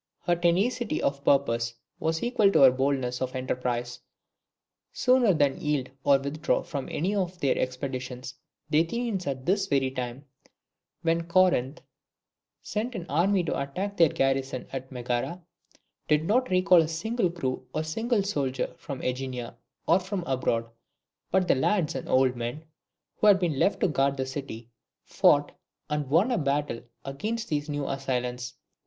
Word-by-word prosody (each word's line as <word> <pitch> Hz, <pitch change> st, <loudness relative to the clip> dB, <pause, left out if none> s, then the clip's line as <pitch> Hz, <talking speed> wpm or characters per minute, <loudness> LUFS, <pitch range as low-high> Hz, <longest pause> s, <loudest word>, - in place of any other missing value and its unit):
Her 175 Hz, -, +2 dB
tenacity 190 Hz, +5 st, +1 dB
of 140 Hz, 0 st, -1 dB
purpose 115 Hz, -4 st, +2 dB, 0.2 s
was 160 Hz, 0 st, -1 dB
equal 230 Hz, -5 st, +3 dB
to -, -, +5 dB
her 135 Hz, -2 st, +9 dB
boldness 130 Hz, -1 st, -1 dB
of 130 Hz, 0 st, -2 dB
enterprise. 125 Hz, -1 st, -2 dB, 0.9 s
Sooner 255 Hz, -4 st, +4 dB
than 145 Hz, -1 st, +1 dB
yield 145 Hz, -5 st, -1 dB
or 140 Hz, -, +5 dB
withdraw 140 Hz, +4 st, -1 dB
from 145 Hz, -6 st, -5 dB
any 185 Hz, +6 st, -1 dB
of 185 Hz, -3 st, -2 dB
their 140 Hz, -5 st, +2 dB
expeditions 130 Hz, -1 st, -4 dB, 0.4 s
the 150 Hz, -, +5 dB
Athenians 195 Hz, +1 st, -1 dB
at 130 Hz, -2 st, -3 dB
this 195 Hz, +1 st, +1 dB
very 135 Hz, -2 st, +1 dB
time, 130 Hz, +1 st, -5 dB, 0.8 s
when 165 Hz, 0 st, +1 dB
Corinth 170 Hz, -5 st, +2 dB, 0.8 s
sent 230 Hz, +3 st, -3 dB
an 175 Hz, -, -5 dB
army 180 Hz, +5 st, +2 dB
to 165 Hz, -, -2 dB
attack 185 Hz, +9 st, -4 dB
their 165 Hz, -2 st, +6 dB
garrison 135 Hz, -1 st, -1 dB
at 130 Hz, 0 st, -5 dB
Megara, 125 Hz, +6 st, -2 dB, 0.7 s
did 150 Hz, 0 st, +3 dB
not 250 Hz, +7 st, +2 dB
recall 185 Hz, -1 st, +5 dB
a 160 Hz, -, 0 dB
single 185 Hz, +6 st, -1 dB
crew 130 Hz, -7 st, -4 dB
or 155 Hz, -, -1 dB
a -, -, -3 dB
single 225 Hz, +7 st, 0 dB
soldier 140 Hz, -10 st, -2 dB
from 140 Hz, -3 st, -6 dB
AEgina 125 Hz, -2 st, -3 dB, 0.3 s
or 170 Hz, -, +5 dB
from 190 Hz, 0 st, -4 dB
abroad; 125 Hz, -5 st, 0 dB, 0.6 s
but 185 Hz, 0 st, +2 dB
the -, -, +5 dB
lads 155 Hz, +5 st, +1 dB
and 130 Hz, -, -6 dB
old 130 Hz, -1 st, +3 dB
men, 120 Hz, +6 st, -5 dB, 0.5 s
who 215 Hz, -, +3 dB
had 205 Hz, -2 st, +8 dB
been 165 Hz, -7 st, -1 dB
left 200 Hz, -, +2 dB
to -, -, +4 dB
guard 140 Hz, -2 st, +1 dB
the 130 Hz, -, -1 dB
city, 130 Hz, -4 st, -6 dB, 0.4 s
fought -, -, +3 dB, 0.4 s
and 150 Hz, -2 st, -1 dB
won 175 Hz, -, +3 dB
a 245 Hz, -, +1 dB
battle 145 Hz, -4 st, -1 dB, 0.2 s
against 215 Hz, +12 st, -3 dB
these 150 Hz, 0 st, -2 dB
new 145 Hz, -1 st, -2 dB
assailants. 125 Hz, -2 st, -3 dB
145 Hz, 160 wpm, -27 LUFS, 130-180 Hz, 0.9 s, her